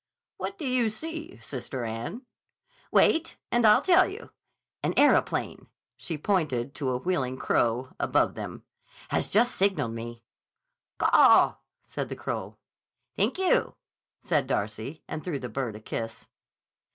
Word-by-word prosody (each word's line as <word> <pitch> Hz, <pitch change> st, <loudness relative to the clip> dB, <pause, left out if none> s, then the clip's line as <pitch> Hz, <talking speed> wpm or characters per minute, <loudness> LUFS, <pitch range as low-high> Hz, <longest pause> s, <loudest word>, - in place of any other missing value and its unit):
"What 400 Hz, -, -5 dB
do 320 Hz, -, -5 dB
you 250 Hz, -3 st, +2 dB
see, 325 Hz, -, -7 dB
Sister 130 Hz, -1 st, -6 dB
Anne?" 115 Hz, -, -5 dB, 0.7 s
"Wait 330 Hz, 0 st, +3 dB
and 240 Hz, -2 st, +4 dB
I'll 210 Hz, -, +6 dB
tell 370 Hz, 0 st, +5 dB
you. 420 Hz, +4 st, -9 dB, 0.5 s
An -, -, -1 dB
aeroplane"—she 165 Hz, -, 0 dB
pointed 145 Hz, -8 st, 0 dB
to 140 Hz, -3 st, -2 dB
a 125 Hz, -, 0 dB
wheeling 130 Hz, -4 st, -1 dB
crow 120 Hz, +2 st, 0 dB
above -, -, +2 dB
them—"has -, -, -6 dB
just 240 Hz, +5 st, +3 dB
signaled 160 Hz, -, +1 dB
me—" 115 Hz, 0 st, -7 dB, 0.7 s
("Caw," -, -, +6 dB, 0.3 s
said -, -, -5 dB
the -, -, -4 dB
crow; -, -, -5 dB, 0.6 s
"Thank -, -, +1 dB
you," 380 Hz, -1 st, +2 dB, 0.4 s
said 150 Hz, -6 st, 0 dB
Darcy 110 Hz, +5 st, -3 dB
and 155 Hz, -, -5 dB
threw 170 Hz, -6 st, -2 dB
the 125 Hz, -2 st, -6 dB
bird 120 Hz, -2 st, -3 dB
a -, -, -8 dB
kiss.) 115 Hz, +1 st, -6 dB
150 Hz, 130 wpm, -27 LUFS, -, 0.7 s, I'll